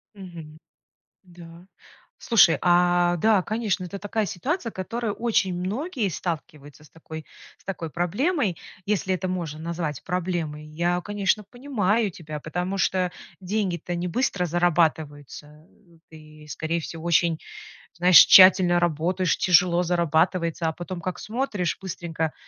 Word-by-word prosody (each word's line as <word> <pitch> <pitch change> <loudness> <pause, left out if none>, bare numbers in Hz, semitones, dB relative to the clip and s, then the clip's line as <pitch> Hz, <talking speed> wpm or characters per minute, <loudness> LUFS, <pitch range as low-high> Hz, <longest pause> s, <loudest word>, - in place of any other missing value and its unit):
Мгм. 170 -6 -11 0.6
Да. 175 -1 -14 0.5
Слушай, 210 -8 +4
а, 175 0 +3
да, 210 +1 +3
конечно, 215 -3 -2
это 200 +3 -7
такая 210 +2 -2
ситуация, 250 - -3
которая 220 +3 -4
очень 215 -5 0
многие 220 - -2
сталкиваются 155 -4 -6
с - - -18
такой 160 -1 -10 0.3
с - - -27
такой 170 -4 -5
проблемой, 200 - -1 0.3
если 190 -2 0
это 185 0 -3
можно 170 -5 -4
назвать 160 -4 -4
проблемой. 170 -4 -3
Я, 170 +3 -1
конечно, 205 0 -1
понимаю 225 -3 -1
тебя, 155 -3 -8
потому 180 +6 -3
что 185 -1 0 0.3
деньги-то 180 -3 -2
не 175 +1 -3
быстро 195 -3 -1
зарабатываются, 155 -3 -1 0.4
э, 160 - -13
и, 155 0 -15
скорее 165 +3 -3
всего, 160 +1 -8
очень, 170 -1 +2 0.6
знаешь, 180 +1 +6
тщательно 185 -2 +7
работаешь, 175 +2 0
тяжело 180 0 +3
зарабатывается, 170 0 0
а 160 - -1
потом 175 0 -7
как 185 +1 -4
смотришь: 215 - -2
быстренько, 165 -4 -4
175 Hz, 130 wpm, -24 LUFS, 165-195 Hz, 0.6 s, тщательно